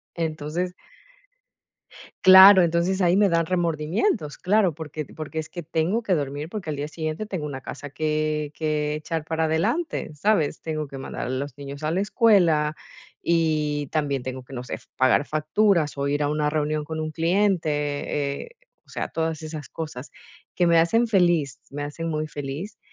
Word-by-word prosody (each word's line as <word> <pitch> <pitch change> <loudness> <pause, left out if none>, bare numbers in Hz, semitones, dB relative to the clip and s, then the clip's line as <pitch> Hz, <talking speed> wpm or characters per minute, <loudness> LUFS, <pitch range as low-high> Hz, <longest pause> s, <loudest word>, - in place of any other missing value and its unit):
Entonces 165 +2 -3 1.5
Claro, 190 +1 +10
entonces 170 +3 +1
ahí 180 +2 +4
me 205 -1 +5
dan 165 -2 +2
remordimientos. 170 - 0
Claro, 190 -3 +2
porque 155 0 -6
porque 160 0 -5
es 155 - -5
que 175 - -6
tengo 165 +7 0
que 195 - +1
dormir, 145 -1 -2
porque 185 -2 -6
al 150 - -3
día 145 +1 -3
siguiente 155 +5 -4
tengo 185 -7 -4
una 135 -2 -5
casa 145 +2 -8
que 155 0 -1
que 150 -1 -1
echar 155 0 -4
para 160 0 -1
adelante, 165 - 0
¿sabes? 160 -3 +1
Tengo 155 -2 -3
que 135 - -9
mandar 135 - -5
a - - -4
los 130 +1 -4
niños 140 +1 -8
a 155 - 0
la 180 - 0
escuela, 175 -9 +3 0.4
y 155 -3 +1
también 140 -4 -1
tengo 130 -1 -6
que, 135 - -13
no 125 -1 -5
sé, - - -6 0.2
pagar 130 +2 +3
facturas, 155 +1 +1
o 140 0 -1
ir 145 +1 0
a 145 - +1
una 150 0 0
reunión 150 0 -1
con 160 0 -4
un 155 0 -3
cliente, 155 -6 0
eh, - - -15 0.4
o - - -27
sea, - - -4
todas 160 -1 -2
esas 155 -4 -7
cosas 150 -4 -7 0.5
que 175 - +2
me 170 -1 +5
hacen 225 +9 +3
feliz. 175 - +2
Me 145 +1 -4
hacen 155 +3 -5
muy 155 -1 -2
feliz, 150 +10 -6
155 Hz, 175 wpm, -24 LUFS, 145-170 Hz, 1.5 s, Claro